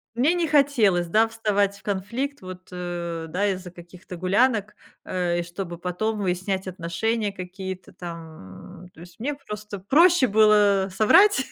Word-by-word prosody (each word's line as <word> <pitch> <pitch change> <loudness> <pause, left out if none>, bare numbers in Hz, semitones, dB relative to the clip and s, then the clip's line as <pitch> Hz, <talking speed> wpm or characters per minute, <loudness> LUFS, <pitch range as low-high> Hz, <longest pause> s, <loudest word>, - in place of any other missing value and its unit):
Мне 275 +8 +3
не 345 -2 0
хотелось, 255 - +3
да, 215 +7 +3
вставать 205 -3 0
в - - -22
конфликт 230 +8 -3
вот, 185 0 -10
э, 175 -2 -5
да, 200 +5 0
из-за 185 -2 -4
каких-то 180 +1 -12
гулянок, 210 +4 +1 0.3
э, 175 -2 -1
и - - -2
чтобы 175 0 -7
потом 195 +5 -2
выяснять 190 0 -2
отношения 200 +5 -2
какие-то 185 0 -8
там. 165 - -10
То - - -17
есть 175 0 -14
мне 280 +6 -1
просто 210 -6 -8
проще 315 - +4
было 205 -3 +4
соврать, 270 - +5
195 Hz, 145 wpm, -24 LUFS, 180-220 Hz, 0.3 s, соврать